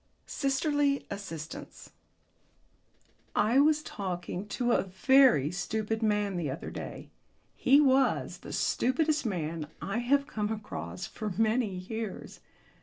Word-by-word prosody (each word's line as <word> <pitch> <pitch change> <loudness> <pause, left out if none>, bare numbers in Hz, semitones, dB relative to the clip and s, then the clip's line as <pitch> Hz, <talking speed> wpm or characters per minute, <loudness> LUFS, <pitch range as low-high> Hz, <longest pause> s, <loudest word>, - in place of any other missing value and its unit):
SISTERLY 280 0 0
ASSISTANCE 165 -6 -7 1.4
I 230 +5 +4
was 305 +1 +4
talking 185 - -4
to 245 +3 -1
a - - +4
very 195 - +4
stupid 220 +4 -2
man 210 -3 +1
the 160 -5 -2
other 135 - -5
day. - - -7 0.4
He 275 +3 +5
was 270 -2 +2
the - - -9
stupidest 300 +1 +1
man 165 -5 -3
I 200 +4 -2
have 275 +4 +2
come 210 -5 -3
across 90 - -5
for 215 - -5
many 225 +2 +2
years. 195 +3 -6
220 Hz, 115 wpm, -30 LUFS, 185-270 Hz, 1.4 s, He